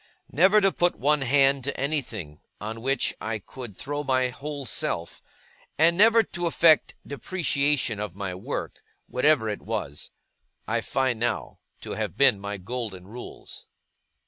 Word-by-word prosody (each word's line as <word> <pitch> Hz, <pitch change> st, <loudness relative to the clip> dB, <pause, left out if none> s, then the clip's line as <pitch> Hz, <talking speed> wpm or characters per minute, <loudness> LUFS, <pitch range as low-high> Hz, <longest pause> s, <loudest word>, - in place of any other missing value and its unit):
Never 190 Hz, +7 st, +5 dB
to 195 Hz, -1 st, +4 dB
put 175 Hz, -1 st, +1 dB
one 145 Hz, +2 st, +2 dB
hand 135 Hz, 0 st, +3 dB
to 140 Hz, -, -3 dB
anything, 120 Hz, -, -3 dB, 0.2 s
on 110 Hz, +2 st, -5 dB
which 135 Hz, +1 st, 0 dB
I 110 Hz, 0 st, -2 dB
could 110 Hz, 0 st, -10 dB
throw 145 Hz, +1 st, -3 dB
my 130 Hz, -2 st, +1 dB
whole 140 Hz, +2 st, -6 dB
self; 85 Hz, -7 st, -2 dB, 0.6 s
and 165 Hz, +2 st, +5 dB
never 225 Hz, +4 st, +6 dB
to 175 Hz, -3 st, -3 dB
affect 160 Hz, -1 st, +4 dB
depreciation 140 Hz, -, 0 dB
of 105 Hz, -4 st, -4 dB
my 95 Hz, -2 st, -4 dB
work, 90 Hz, -, -5 dB, 0.2 s
whatever 125 Hz, -3 st, +2 dB
it 105 Hz, -1 st, -3 dB
was; 95 Hz, -10 st, -4 dB, 0.6 s
I -, -, 0 dB
find, 130 Hz, -3 st, 0 dB
now, 120 Hz, -1 st, -2 dB, 0.2 s
to -, -, -7 dB
have -, -, -3 dB
been 100 Hz, -, +5 dB
my 100 Hz, +1 st, -5 dB
golden 100 Hz, -2 st, -6 dB
rules. 120 Hz, +4 st, -10 dB
130 Hz, 145 wpm, -26 LUFS, 105-150 Hz, 0.6 s, never